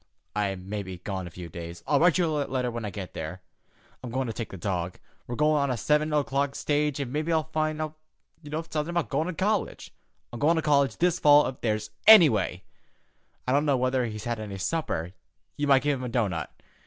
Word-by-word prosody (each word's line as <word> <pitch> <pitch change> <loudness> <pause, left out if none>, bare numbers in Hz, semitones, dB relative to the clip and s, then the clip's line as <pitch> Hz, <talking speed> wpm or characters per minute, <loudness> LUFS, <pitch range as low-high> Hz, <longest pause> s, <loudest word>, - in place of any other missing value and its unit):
I 100 -2 0
may 100 +3 -5
be 95 -2 -7
gone 95 0 -5
a - - -7
few 85 +1 -9
days. 85 +1 -8
I'll 145 - +3
write 175 0 +4
you 180 - +3
a 160 - -1 0.2
letter 125 -2 -1
when 115 -1 -5
I - - -2
get 95 -2 -7
there. 90 +4 -6 0.6
I'm 125 - -5
goin' 130 +3 -1
to 115 - -4
take 115 +1 -5
the 95 - -8
dog. 90 -1 -3 0.3
We're 120 - -4
goin' 150 +2 +3
on 140 - 0
the 125 - 0
seven 150 +6 +1
o'clock 140 -1 0
stage 150 -1 0
an' 135 -3 -3
mebbe 155 +3 -2
I'll 160 -1 +2
find 155 0 -2
out 155 0 -4 0.4
somethin' 155 +1 -3
about 170 -9 -1
goin' 155 +4 0
to 180 - -3
college. 200 +4 -1 0.4
I'm 120 - -6
goin' 160 +6 +4
to 160 - 0
college 140 -6 +2
this 175 0 +2
fall 145 0 +7
if 130 +1 -5
there's 110 -1 -1 0.2
any 210 -8 +10
way. 95 -5 -1 0.8
I - - +1
don't 140 +2 +3
know 140 -2 +3
whether 130 -1 +1
he's 110 -1 -6
had 120 -1 -2
any 105 -2 -6
supper. 95 - -2 0.4
You 145 - -1
might 135 -1 +5
give 145 -2 +1
him - - -6
a - - -3
doughnut. 100 - -1
130 Hz, 225 wpm, -27 LUFS, 105-150 Hz, 0.8 s, any